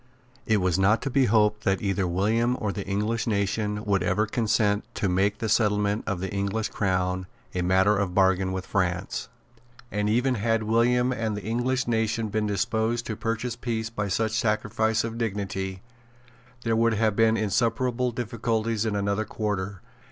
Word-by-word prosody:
It 110 - +4
was 90 -2 +1
not 105 +4 +4
to 135 - -2
be 135 0 +3
hoped 105 -1 +2
that 95 -1 +1
either 100 -2 0
William 110 +7 +1
or 105 -3 -1
the 100 -1 -6
English 105 +4 -1
nation 105 0 -1
would 100 -2 +2
ever 105 +4 +1
consent 105 -2 +1
to 100 - 0
make 100 +3 +1
the 110 - -3
settlement 105 -1 +1
of 100 -4 -1
the 95 +1 -4
English 100 +3 -1
crown 90 -2 -1 0.3
a 90 - -1
matter 95 +3 +3
of 95 -3 -1
bargain 95 -1 +3
with 95 0 -4
France. 90 -3 -2 0.6
And 105 +1 0
even 125 +4 +2
had 115 0 0
William 120 +3 +2
and 110 -4 -2
the 105 - -6
English 120 +4 0
nation 115 -1 0
been 110 0 -1
disposed 110 +3 0
to 110 - -3
purchase 115 +2 -2
peace 115 -2 -3
by 105 -2 -2
such 110 +3 0
a 110 - -1
sacrifice 110 0 +1
of 115 0 -4
dignity, 95 -3 -3 0.8
there 115 -1 +1
would 115 0 +3
have 110 -1 +1
been 115 0 +4
insuperable 115 +4 0
difficulties 115 -1 -1
in 105 - -1
another 100 +1 0
quarter. 100 -3 -3
105 Hz, 175 wpm, -26 LUFS, 100-115 Hz, 0.8 s, It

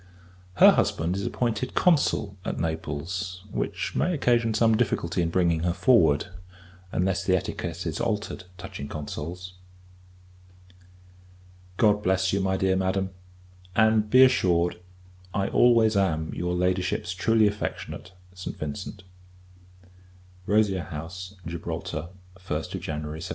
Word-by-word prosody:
Her - - +8
husband 85 +3 0
is 100 - -2
appointed 120 0 -2
Consul 145 - +2
at - - -3
Naples; 85 +4 -4
which - - -3
may 180 +1 +1
occasion 120 -5 +2
some 110 0 +4
difficulty 95 -6 0
in 85 - 0
bringing 85 -2 +2
her 85 +1 0
forward, 80 - +4 0.7
unless 95 +1 0
the 95 0 +3
etiquette 85 0 -5
is 80 -1 -3
altered 105 -4 -2
touching 90 -6 -7
Consuls. 85 +5 -6 2.2
God 105 -2 +4
bless 95 -1 +1
you, 100 - +1
my 95 0 0
dear 95 0 +2
Madam; 95 0 0 0.6
and, 110 -1 +3
be 130 +4 +8
assured, 90 -9 +3 0.6
I 100 0 0
always 115 -3 +4
am 80 -5 0
your 90 0 -2
Ladyship's 90 -1 0
truly 110 +4 +3
affectionate 105 -3 -3 0.2
ST. 90 0 -7
VINCENT. 85 +6 -6 1.4
Rosia 100 -4 +2
House, 90 +4 -7
Gibraltar, 85 -2 -5 0.3
1st 90 - -4
January 75 0 -5
1799. - - -7
95 Hz, 120 wpm, -26 LUFS, 85-105 Hz, 2.2 s, Her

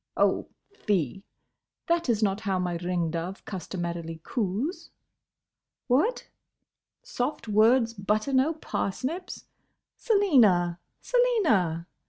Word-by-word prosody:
—Oh! - - +2 0.3
fie! 195 - -1 0.6
That 335 -4 0
is 220 -2 +2
not 195 -1 +1
how 200 -4 -1
my 180 -1 -1
ring 175 -1 -1
dove 170 +4 -5
customarily 170 -3 -5
coos.—What? 260 - -4 0.8
soft 295 - -3
words 230 +3 +4
butter 215 +5 -1
no 265 +5 +3
parsnips?—Selina, 265 - 0 0.2
Selina—! 310 - +2
215 Hz, 85 wpm, -27 LUFS, 180-295 Hz, 0.8 s, words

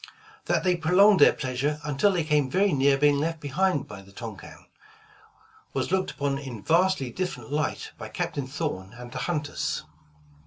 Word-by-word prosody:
That - - +1
they 180 -1 +3
prolonged 180 +4 +5
their 145 - +8
pleasure 135 +3 -2
until 150 +7 +2
they 175 -4 0
came 150 -3 +1
very 195 +6 +2
near 135 0 +4
being 145 0 +3
left 165 +2 -2
behind 150 +2 0
by 100 - -9
the 95 0 -17
Tonquin, 110 -3 -9 1.1
was - - -2
looked 190 0 +1
upon 140 -1 -2
in 125 -7 -8
vastly 170 -6 +2
different 140 -8 -4
light 150 0 -2
by - - -7
Captain 140 -2 -3
Thorn 135 - -4
and 125 -1 -9
the - - -5
hunters. 150 -4 -2
145 Hz, 165 wpm, -26 LUFS, 130-175 Hz, 1.1 s, their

